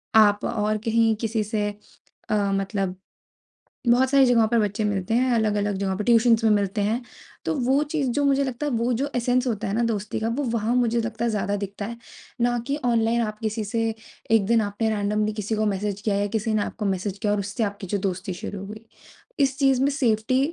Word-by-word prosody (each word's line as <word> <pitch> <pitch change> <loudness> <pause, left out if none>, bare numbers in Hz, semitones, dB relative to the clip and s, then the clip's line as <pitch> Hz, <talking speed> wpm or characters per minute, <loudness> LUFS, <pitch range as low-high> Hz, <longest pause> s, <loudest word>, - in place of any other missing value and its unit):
आप 205 -2 +5
और 215 -2 0
कहीं 225 -1 +3
किसी 225 -1 0
से 210 -1 -1 0.6
अ, - - 0 0.2
मतलब 195 -1 -1 0.9
बहुत 255 +2 +4
सारी 275 -1 +6
जगहों 235 -3 +4
पर 235 +1 +2
बच्चे 210 +1 -1
मिलते 205 0 -1
हैं 255 +2 +2
अलग-अलग 210 -2 +1
जगहों 190 -1 -1
पे 210 - -3
ट्यूशन्स 230 0 +4
में 220 - +5
मिलते 205 0 +1
हैं। 220 +5 0 0.4
तो - - 0
वो 270 +3 +3
चीज़ 290 -5 0
जो 285 +3 0
मुझे 280 0 +3
लगता 265 +2 -3
है 290 - -1
वो 235 +1 +1
जो 275 +4 -1
एसेंस 245 +1 +1
होता 225 -3 -2
है 200 - -2
ना 235 - +1
दोस्ती 210 -1 -3
का 220 - -1
वो 290 - 0
वहाँ 230 +1 0
मुझे 235 -1 +2
लगता 230 0 -3
है 235 - +1
ज़्यादा 205 -1 -1
दिखता 200 0 -5
है। 235 +2 -6 0.4
ना 240 0 +2
कि 280 - -1
ऑनलाइन 235 -1 +2
आप 215 -1 -4
किसी 220 0 -2
से 225 +2 -1 0.4
एक 225 -3 +4
दिन 230 +1 +3
आपने 210 +2 -1
रैंडमली 210 0 0
किसी 210 +1 -3
को 215 0 +1
मैसेज 200 0 -2
किया 205 -1 0
या 205 0 +1
किसी 220 0 -1
ने 215 - +2
आपको 210 - -5
मैसेज 195 +1 -2
किया 205 0 0
और 205 - +1
उससे 205 +4 -2
आपकी 200 -1 -5
जो 200 +3 -1
दोस्ती 185 0 -4
शुरू 195 +3 -6
हो 195 - -7
गई। 215 +2 -10 0.5
इस 270 -1 +2
चीज़ 270 -2 +3
में 280 - +3
सेफ्टी 255 -3 +1
220 Hz, 220 wpm, -24 LUFS, 205-235 Hz, 0.9 s, सारी